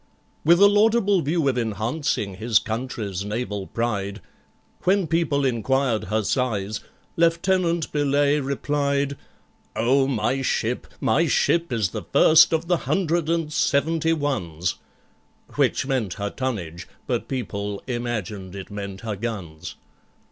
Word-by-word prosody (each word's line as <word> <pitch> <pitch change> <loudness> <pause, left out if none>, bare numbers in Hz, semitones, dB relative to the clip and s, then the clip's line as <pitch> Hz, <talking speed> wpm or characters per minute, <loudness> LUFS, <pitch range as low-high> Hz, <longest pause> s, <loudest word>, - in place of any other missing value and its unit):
With 170 +3 +5
a 200 - +8
laudable 205 -2 +3
view 155 0 0
of 130 -2 +1
enhancing 110 - -2
his 110 +1 +2
country's 110 -4 -3
naval 105 -2 -3
pride, 100 -4 -2 0.6
When 195 0 +2
people 155 -4 +1
inquired 130 -1 +1
her 110 +3 0
size, 105 -4 -1 0.4
LIEUTENANT 170 0 +2
BELAYE 145 0 +2
replied, 140 0 -1 0.6
"Oh, 130 +5 +3
my 130 +1 0
ship, 130 - -1
my - - +2
ship 170 -2 +2
is 110 -6 +1
the - - -5
first 160 +1 +6
of 160 0 0
the 175 -1 +3
Hundred 170 -4 +1
and 165 -2 0
Seventy 160 +4 +1
ones!" 95 - -2 0.7
Which - - +1
meant 125 -9 -1
her 100 -1 -3
tonnage, 90 -10 -4 0.2
but - - -2
people 100 -6 -4
imagined 110 -6 -4
it 100 +1 -8
meant 100 -2 -6
her 110 -2 -3
guns. 95 -7 -6
130 Hz, 125 wpm, -24 LUFS, 105-155 Hz, 0.7 s, a